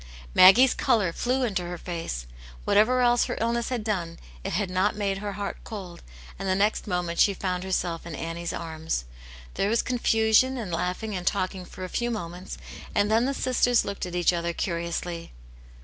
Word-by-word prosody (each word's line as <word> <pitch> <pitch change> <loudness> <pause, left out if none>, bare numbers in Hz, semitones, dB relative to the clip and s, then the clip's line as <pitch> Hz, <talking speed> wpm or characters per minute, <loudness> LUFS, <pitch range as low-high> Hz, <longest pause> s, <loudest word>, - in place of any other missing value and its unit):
Maggie's 240 +8 +8
colour 195 -7 +2
flew 255 +6 0
into 200 -7 0
her 175 0 -5
face; 165 - -4 0.4
whatever 245 +5 +4
else 240 -1 +4
her - - -3
illness 235 +1 0
had 245 -4 -2
done, 175 -6 -2 0.3
it - - -3
had 195 +3 0
not 185 +3 +1
made 200 -2 -1
her 205 0 -4
heart 200 0 -4
cold, 190 -5 -8 0.4
and. 195 -1 -2
the 185 - +3
next 205 +3 +1
moment 175 -2 -2
she 200 - +5
found 180 -1 -2
herself 180 -3 -1
in 170 -2 -7
Annie's 165 +2 -4
arms. 160 - -3 0.5
There 200 - 0
was 230 +1 +2
confusion 235 +1 +3
and 215 -7 -4
laughing 180 +5 -2
and 180 0 -4
talking 185 -2 -1
for 185 - -9
a - - -3
few 240 +6 -1
moments, 180 -5 -5 0.4
and 205 +1 +2
then 225 +2 +4
the 275 +1 -1
sisters 245 -2 +2
looked 200 -2 -4
at 180 - -6
each 175 0 +3
other 170 0 -1
curiously. 170 0 -3
190 Hz, 185 wpm, -26 LUFS, 175-220 Hz, 0.5 s, Maggie's